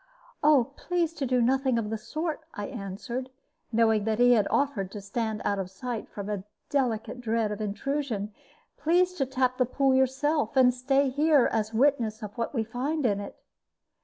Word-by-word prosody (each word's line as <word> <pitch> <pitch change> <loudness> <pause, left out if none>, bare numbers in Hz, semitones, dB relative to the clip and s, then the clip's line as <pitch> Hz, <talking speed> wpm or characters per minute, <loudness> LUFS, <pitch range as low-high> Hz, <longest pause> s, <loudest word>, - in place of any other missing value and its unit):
"Please 345 -2 -1
to 280 -5 -3
do 250 0 +2
nothing 260 0 +2
of 215 -2 -2
the 220 - -1
sort," 315 +6 -3
I 205 - -4
answered, 235 +4 -5 0.4
knowing 220 -2 +3
that 220 -1 0
he 245 0 +6
offered 215 -1 +1
to 210 - -5
stand 215 +2 -3
out 200 - +1
of 185 -1 -3
sight 225 +4 -5
from 200 -1 -7
a 205 -3 -3 0.3
delicate 250 -3 -1
dread 225 -2 0
of 210 - -4
intrusion. 215 -1 -2 0.4
"Please 360 +3 +2
to 275 -7 -1
tap 255 -1 0
the 255 - +4
pool 270 +1 +2
yourself, 265 0 +1
and 250 -1 +6
stay 270 +2 +2
here, 290 0 +4
as 215 -1 -1
a 220 - -3
witness 235 -5 +2
of 210 -1 -7
what 230 -2 -2
we 225 - +1
find 260 +7 -2
in 205 -4 +2
it." 200 - -8
245 Hz, 180 wpm, -27 LUFS, 215-275 Hz, 0.4 s, he